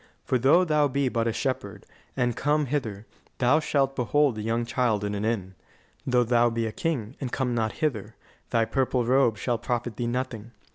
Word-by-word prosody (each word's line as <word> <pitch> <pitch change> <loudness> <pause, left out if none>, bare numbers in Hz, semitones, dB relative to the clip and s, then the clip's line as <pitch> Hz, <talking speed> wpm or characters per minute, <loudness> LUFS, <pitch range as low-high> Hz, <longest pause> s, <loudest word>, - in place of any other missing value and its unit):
For 130 - +1
though 145 +9 +5
thou 150 -3 +3
be 140 -1 0
but 115 -1 0
a - - +2
shepherd, 130 +3 -3 0.3
and 120 -2 +1
come 150 +1 +1
hither, 115 -7 -3 0.3
thou 130 +5 +4
shalt 135 -3 0
behold 135 +3 +2
the 110 - -6
young 115 +2 -1
Child 115 -3 0
in 105 0 -2
an 100 0 -3
inn. 105 -4 -2 0.5
Though 125 -1 +3
thou 120 0 +3
be 115 0 -2
a 110 - -2
king, 130 -5 -3
and 130 -3 -3
come 125 -2 -1
not 110 -2 0
hither, 115 -8 -2 0.3
thy 115 -2 +2
purple 125 +1 0
robe 125 -3 +3
shall 120 +3 -1
profit 120 -2 -3
thee 120 - -2
nothing. 120 -2 -4
120 Hz, 195 wpm, -26 LUFS, 115-135 Hz, 0.5 s, though